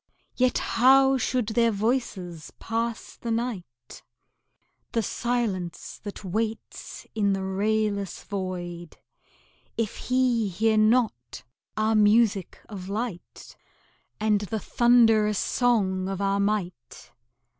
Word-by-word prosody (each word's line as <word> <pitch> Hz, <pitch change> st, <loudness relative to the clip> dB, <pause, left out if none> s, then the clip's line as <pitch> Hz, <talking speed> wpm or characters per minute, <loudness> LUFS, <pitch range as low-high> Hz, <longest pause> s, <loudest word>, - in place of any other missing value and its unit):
Yet 255 Hz, -1 st, +2 dB
how 265 Hz, +2 st, +4 dB
should 245 Hz, -2 st, 0 dB
their 230 Hz, +1 st, +3 dB
voices 200 Hz, -7 st, -2 dB
pass 230 Hz, 0 st, -3 dB
the 235 Hz, -, -6 dB
night, 190 Hz, -, -5 dB, 0.9 s
The 230 Hz, -, +1 dB
silence 205 Hz, -7 st, -3 dB
that 205 Hz, 0 st, -8 dB
waits 220 Hz, +4 st, -4 dB
in 205 Hz, -2 st, +1 dB
the 195 Hz, 0 st, -2 dB
rayless 200 Hz, 0 st, -1 dB
void, 175 Hz, -3 st, -5 dB, 0.8 s
If 225 Hz, -2 st, -2 dB
he 250 Hz, -3 st, +1 dB
hear 220 Hz, +4 st, +1 dB
not 215 Hz, -, +1 dB, 0.3 s
our 215 Hz, +1 st, +2 dB
music 210 Hz, -2 st, +3 dB
of 190 Hz, -3 st, -8 dB
light, 210 Hz, -3 st, -6 dB, 0.6 s
And 210 Hz, -1 st, +2 dB
the 210 Hz, +2 st, -3 dB
thundrous 225 Hz, -3 st, +4 dB
song 195 Hz, -7 st, +1 dB
of 195 Hz, -1 st, -4 dB
our 200 Hz, 0 st, +1 dB
might? 200 Hz, -, -3 dB
215 Hz, 105 wpm, -26 LUFS, 190-230 Hz, 0.9 s, how